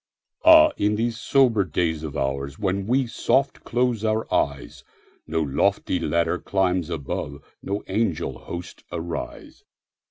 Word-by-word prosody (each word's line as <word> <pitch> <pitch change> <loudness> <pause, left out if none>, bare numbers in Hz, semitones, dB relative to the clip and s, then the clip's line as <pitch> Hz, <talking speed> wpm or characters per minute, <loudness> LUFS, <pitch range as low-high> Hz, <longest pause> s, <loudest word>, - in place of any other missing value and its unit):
Ah, 315 -1 +8
in 105 +1 +1
these 115 +1 -1
sober 120 -4 +3
days 80 -2 -1
of 80 -3 -6
oursWhen 70 +10 -2
we 130 +3 +2
soft 135 +3 0
close 120 -2 0
our 110 0 0
eyes, 70 -1 -1 0.4
No 80 +1 0
lofty 70 -2 0
ladder 85 +1 0
climbs 90 -3 0
above, 70 -2 -4 0.2
No 100 +1 -3
angel 90 - -1
hosts 85 0 -8
arise. 85 0 -6
95 Hz, 125 wpm, -24 LUFS, 80-115 Hz, 0.4 s, Ah